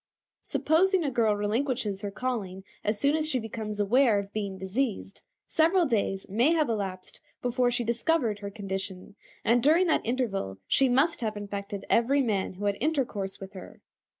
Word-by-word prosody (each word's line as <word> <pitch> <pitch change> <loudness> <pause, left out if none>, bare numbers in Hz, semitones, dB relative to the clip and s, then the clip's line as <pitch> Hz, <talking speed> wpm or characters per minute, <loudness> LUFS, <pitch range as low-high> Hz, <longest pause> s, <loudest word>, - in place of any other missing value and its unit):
Supposing 365 +3 +2
a 285 - -1
girl 225 -4 +2
relinquishes 215 -1 -1
her 205 - -3
calling 200 -5 -4 0.2
as 210 0 0
soon 280 +5 +3
as 310 -1 0
she 265 - +1
becomes 220 -2 -5
aware 225 +2 +4
of 200 0 -4
being 200 -3 -3
diseased, 195 +2 -3 0.2
several 335 +3 +3
days 205 -7 -1
may 235 - +3
have 310 -3 +2
elapsed 195 -4 -4 0.2
before 245 0 +2
she 245 0 -1
discovered 235 -1 0
her 200 -1 -5
condition, 195 -2 -5 0.3
and 235 +2 +4
during 320 +7 +4
that 325 - +2
interval 220 - -2
she 270 -1 +3
must 275 +6 +2
have 215 -2 -2
infected 200 0 -5
every 265 +5 +3
man 200 -6 -1
who 205 +3 -5
had 200 -1 +1
intercourse 245 -11 -1
with 195 0 -9
her. 190 - -11
225 Hz, 170 wpm, -28 LUFS, 200-270 Hz, 0.3 s, aware